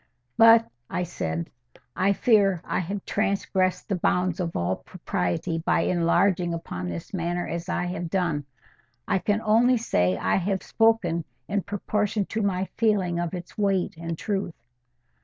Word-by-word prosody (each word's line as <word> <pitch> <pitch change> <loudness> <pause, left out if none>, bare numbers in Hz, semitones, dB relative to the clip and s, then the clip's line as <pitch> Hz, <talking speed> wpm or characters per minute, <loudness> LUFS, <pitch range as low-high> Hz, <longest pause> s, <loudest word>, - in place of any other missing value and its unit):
—But," 230 0 +7 0.2
I 180 - -1
said, 85 - -4 0.4
"I 195 +2 +3
fear 200 -4 +3
I - - -1
have 190 +2 -4
transgressed 190 -3 0
the 200 - 0
bounds 180 0 +1
of 170 -2 -2
all 85 +2 0
propriety 175 -2 -2
by 165 - +1
enlarging 175 0 +2
upon 90 - -5
this 85 - -7
matter 175 -1 -2
as 170 +2 -4
I 180 - 0
have 175 -1 -4
done. 165 -6 0 0.6
I - - +2
can 205 +3 0
only 235 +4 +4
say 90 - +1
I - - +1
have 190 0 -1
spoken 220 -8 +2 0.2
in 200 0 0
proportion 205 +1 -1
to 220 - 0
my 190 -2 0
feeling 195 -6 +2
of 175 +1 -2
its 180 +3 -9
weight 195 -4 +1
and 165 0 -5
truth." 195 -4 -2
185 Hz, 155 wpm, -25 LUFS, 170-205 Hz, 0.6 s, But